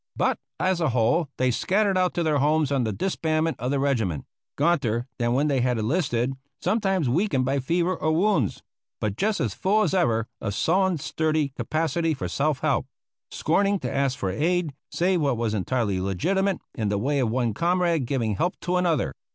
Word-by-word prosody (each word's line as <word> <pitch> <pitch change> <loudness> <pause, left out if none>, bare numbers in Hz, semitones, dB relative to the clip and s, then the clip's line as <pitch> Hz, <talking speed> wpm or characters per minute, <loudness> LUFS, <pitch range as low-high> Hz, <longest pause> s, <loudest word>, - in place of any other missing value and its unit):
But, - - +1 0.2
as 185 -2 +1
a 160 - +2
whole, 125 +6 +2
they 130 0 +2
scattered 195 - +1
out 185 -1 +1
to 175 - +1
their 155 -3 +2
homes 150 0 +2
on 135 -4 +1
the 110 - -1
disbandment 160 - -1
of 125 +2 -2
the 140 - +1
regiment; 115 - 0 0.3
gaunter 120 -9 +1
than 120 0 +1
when 140 +4 +2
they 135 -3 +1
had 125 -1 +1
enlisted, 125 0 0 0.3
sometimes 190 - +1
weakened 140 - +1
by 135 +2 +1
fever 170 +7 0
or 155 - 0
wounds, 165 - +1 0.4
but 105 -2 -2
just 210 - 0
as 115 -5 -1
full 210 +3 +2
as 185 - 0
ever 115 -12 +2
of 105 -3 -3
sullen, 185 +1 +2
sturdy 155 0 0
capacity 160 +3 -1
for 135 - -4
self 145 -2 0
help; - - +1 0.4
scorning 200 +5 +1
to - - -3
ask 135 -1 +1
for 95 - -2
aid, 165 - 0 0.2
save 180 0 +1
what 140 -5 +1
was 115 -2 -1
entirely 105 -2 0
legitimate 190 - 0 0.2
in 110 -3 -2
the 100 - 0
way 140 +7 0
of 125 -4 +1
one 120 -1 0
comrade 170 - +1
giving 115 -7 -1
help 175 +2 -1
to 180 +1 0
another. 170 -6 +1
145 Hz, 190 wpm, -25 LUFS, 120-175 Hz, 0.4 s, a